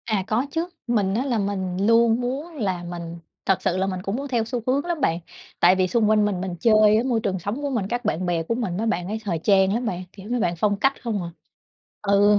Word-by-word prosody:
À, 215 -4 0
có 235 +5 +1
chứ, 330 +3 -1 0.2
mình 205 -5 +1
á 240 +6 0
là 250 -4 0
mình 190 -3 -2
luôn 230 +1 +4
muốn 280 +7 -4
là 190 -9 -2
mình 170 -1 -6 0.3
thật 195 - +2
sự 180 - 0
là 190 +1 +1
mình 185 -1 -3
cũng 195 +3 -3
muốn 280 +3 -4
theo 240 -4 0
xu 245 +1 -3
hướng 275 +4 +1
lắm 345 -3 -2
bạn 165 +1 +1 0.4
tại 180 +2 +6
vì 185 0 +2
xung 215 +3 +2
quanh 215 -1 +4
mình 195 -3 -1
mình 185 -2 -3
chơi 215 0 +5
á, 225 - +1
môi 240 -4 +1
trường 195 -3 -2
sống 205 - -4
của 285 - -1
mình 230 -8 -1
các 240 +3 -3
bạn 180 +4 0
bè 170 -2 0
của 230 - -1
mình 210 -8 -2
mấy 225 +3 -1
bạn 180 -5 -1
ấy 215 +3 -3
thời 175 -6 -2
trang 190 +2 +3
lắm 240 +3 -1
bạn, 185 -4 -3
kiểu, 200 +1 -11
mấy 245 0 0
bạn 175 -5 0
phong 205 +4 +1
cách 270 +4 +1
không 215 -6 -2
à 170 - -5 0.7
ừ, 205 +1 +4
210 Hz, 265 wpm, -23 LUFS, 185-235 Hz, 0.7 s, tại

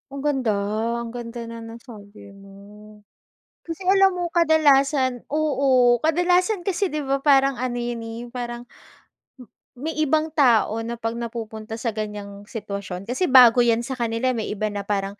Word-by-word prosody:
Ang 280 - -6
ganda 265 -6 +1 0.5
ang 235 - -5
ganda 235 0 -7
ng 230 0 -8
nasabi 210 -4 -13
mo. 200 +2 -15 0.6
Kasi 335 +2 -7
alam 390 0 +5
mo, 350 - -1
kadalasan 285 -6 +3
oo 270 -5 +3
kadalasan 355 +5 +2
kasi 390 0 0
di 305 - -2
ba 275 -1 -2
parang 275 -2 +4
ano 245 0 -3
yun, 240 -1 -4
eh, 225 +1 -7
parang 240 0 -6 0.7
m 255 - -13 0.3
may 295 +6 -4
ibang 310 +1 +1
tao 235 -7 +3
na 230 +1 -4
pag 225 0 -4
napupunta 225 -2 -6
sa 230 +1 -3
ganyang 205 -1 -7
sitwasyon, 200 -4 -6
kasi 255 +10 -1
bago 250 -3 +7
yan 235 0 +2
sa 260 +1 -6
kanila. 235 +2 0
May 230 -3 -3
iba 215 +1 -2
na 200 -1 -6
parang 200 0 -2
240 Hz, 160 wpm, -23 LUFS, 220-280 Hz, 0.7 s, bago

